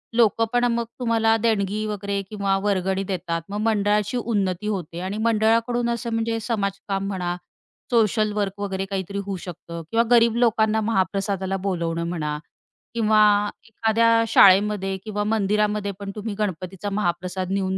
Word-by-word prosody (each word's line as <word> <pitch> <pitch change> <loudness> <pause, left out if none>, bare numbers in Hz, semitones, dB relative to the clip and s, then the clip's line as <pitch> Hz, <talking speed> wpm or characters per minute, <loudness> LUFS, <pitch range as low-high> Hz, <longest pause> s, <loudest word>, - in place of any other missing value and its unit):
लोक 230 -1 +3
पण 245 0 +3
मग 235 0 -1
तुम्हाला 225 -2 +2
देणगी 215 -2 0
वगैरे 200 -1 -2
किंवा 200 -2 0
वर्गणी 190 -1 0
देतात. 175 -3 -3
मग 205 - -4
मंडळाची 210 0 +1
उन्नती 205 -4 -1
होते 175 -5 -3
आणि 190 +3 -3
मंडळाकडून 230 +2 +2
असं 235 0 -2
म्हणजे 225 0 -1
समाजकाम 200 -3 -2
म्हणा, 180 -3 -2 0.6
सोशल 215 -2 +2
वर्क 205 -1 -2
वगैरे 195 -1 -2
काहीतरी 195 0 -3
होऊ 200 -1 -3
शकतं 170 -1 -8
किंवा 230 +1 +3
गरीब 230 -1 +5
लोकांना 220 -2 +2
महाप्रसादाला 195 -2 -1
बोलावणं 170 -3 -1
म्हणा 150 -4 -2 0.6
किंवा 215 -2 +3 0.5
एखाद्या 230 +1 +3
शाळेमध्ये 195 -1 +5
किंवा 210 -1 -2
मंदिरामध्ये 210 0 +1
पण 200 -1 -5
तुम्ही 210 0 -4
गणपतीचा 190 0 -3
महाप्रसाद 185 -1 -2
नेऊन 190 -1 0
205 Hz, 140 wpm, -23 LUFS, 190-225 Hz, 0.6 s, गरीब